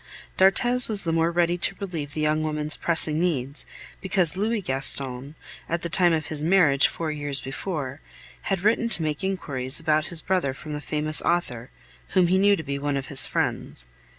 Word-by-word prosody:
D'Arthez 240 +7 +4
was 210 -2 +2
the 165 -2 -1
more 165 0 +1
ready 175 +1 0
to 195 - +3
relieve 165 -8 -6
the 155 - -3
young 155 +1 0
woman's 150 -1 +1
pressing 160 -2 +2
needs, 145 -5 -2 0.3
because 185 -4 0
Louis 215 +4 -1
Gaston, 135 0 +1 0.3
at 170 0 -3
the 170 - -3
time 175 +1 +3
of 160 -2 -1
his 155 -2 -3
marriage 160 -6 +3
four 160 -2 -5
years 145 -2 -4
before, 140 -1 -6 0.5
had 195 -3 -1
written 225 +3 +1
to 170 - +4
make 150 0 -3
inquiries 140 -8 -1
about 155 -2 0
his 170 -2 -5
brother 175 -8 -1
from 155 0 -9
the 150 - -5
famous 155 +1 0
author, 135 -8 -2 0.5
whom 185 - +5
he 185 +1 +2
knew 200 +1 +4
to 160 - -7
be 140 -1 -4
one 145 0 -2
of 135 - -6
his 140 - +6
friends. - - -2
155 Hz, 190 wpm, -24 LUFS, 145-180 Hz, 0.5 s, his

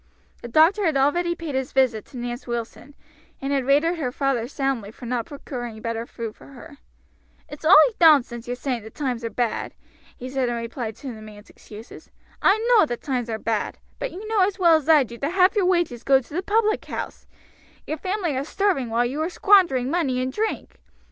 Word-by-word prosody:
The - - -7
doctor 325 - +4
had 310 -4 +1
already 345 +6 +1
paid 330 -4 -6
his 265 0 -3
visit 250 -5 +2
to 260 - -12
Nance 240 +1 -5
Wilson, 235 +4 -6 0.4
and 275 +1 -2
had 270 -2 0
rated 315 +5 +3
her 255 -5 -2
father 260 -3 -1
soundly 270 -6 -2
for 225 - -12
not 240 -1 -2
procuring 240 -6 -7
better 230 +1 -4
food 225 -2 -7
for - - -16
her. 280 +2 -13 0.7
"It's 295 - -11
all 340 +5 +7 0.2
nonsense 265 -8 +4
your 245 - -2
saying 250 -2 -3
the 220 - -10
times 250 -2 -4
are 230 - -2
bad," 240 -1 -2 0.4
he 250 - -7
said 260 -1 -1
in 240 - -2
reply 230 0 -4
to 240 +4 -8
the 220 - -11
man's 210 -1 -13
excuses. 215 +2 -13 0.3
"I 390 - +4
know 445 -9 +5
the 240 - -3
times 250 -3 -3
are 220 - -2
bad; 220 -1 -2 0.2
but - - -3
you 410 +4 -8
know 440 -1 0
as 380 +1 +1
well 340 -3 +5
as 315 -1 -1
I 305 -3 +7
do 235 -1 -10
that 285 +5 -2
half 375 +2 +4
your 390 -4 +2
wages 345 -10 0
go 270 -1 +5
to 265 +2 -14
the 355 - -1
public 430 +2 +1
house; - - -6 0.6
your 310 - -3
family 370 -3 -2
are 265 - -1
starving 325 - 0
while 235 +2 +1
you 275 +6 -3
are 320 - -1
squandering 345 -10 +3
money 280 -8 0
in 255 +1 -2
drink. 435 +9 -4
270 Hz, 210 wpm, -23 LUFS, 240-330 Hz, 0.7 s, all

